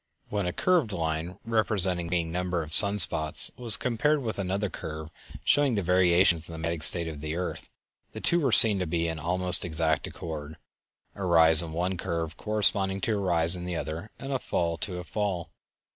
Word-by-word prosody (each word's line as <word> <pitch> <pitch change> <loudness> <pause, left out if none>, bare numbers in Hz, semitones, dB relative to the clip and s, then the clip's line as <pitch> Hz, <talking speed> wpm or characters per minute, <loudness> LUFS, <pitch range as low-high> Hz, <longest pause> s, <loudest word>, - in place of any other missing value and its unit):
When 100 -3 -2
a - - -1
curved 170 - 0
line 80 +1 -4
representing 100 -6 +3
the - - -8
varying 80 - -8
number 90 -1 -2
of 80 0 -7
sun 100 +2 +5
spots 80 -5 +3
was 120 -4 +2
compared 140 +4 -1
with 110 -3 -4
another 100 +2 -2
curve 80 -3 -8 0.3
showing 145 -4 +2
the 100 - -2
variations 90 -1 +2
in - - -9
the - - -8
magnetic 85 0 -4
state 85 +1 +3
of 75 -3 -8
the 75 +1 -5
earth 90 +1 -6 0.4
the - - -8
two 175 - +4
were 140 -6 0
seen 110 -3 +4
to 90 - -3
be 85 +1 -2
in 80 -1 -5
almost 90 +3 +4
exact 80 -1 -2
accord, 80 -2 -8 0.6
a 100 - -8
rise 80 -2 +5
in 85 -2 -7
one 90 +3 -3
curve 85 -3 -4
corresponding 100 -2 +1
to 110 - -1
a 100 - -3
rise 85 -2 +1
in 90 - -7
the 90 -1 -4
other, 80 +6 -6
and 135 0 -6
a 130 - -1
fall 85 -7 -2
to 90 -4 -3
a 90 - -6
fall. 95 -3 -4
90 Hz, 205 wpm, -26 LUFS, 80-100 Hz, 0.6 s, sun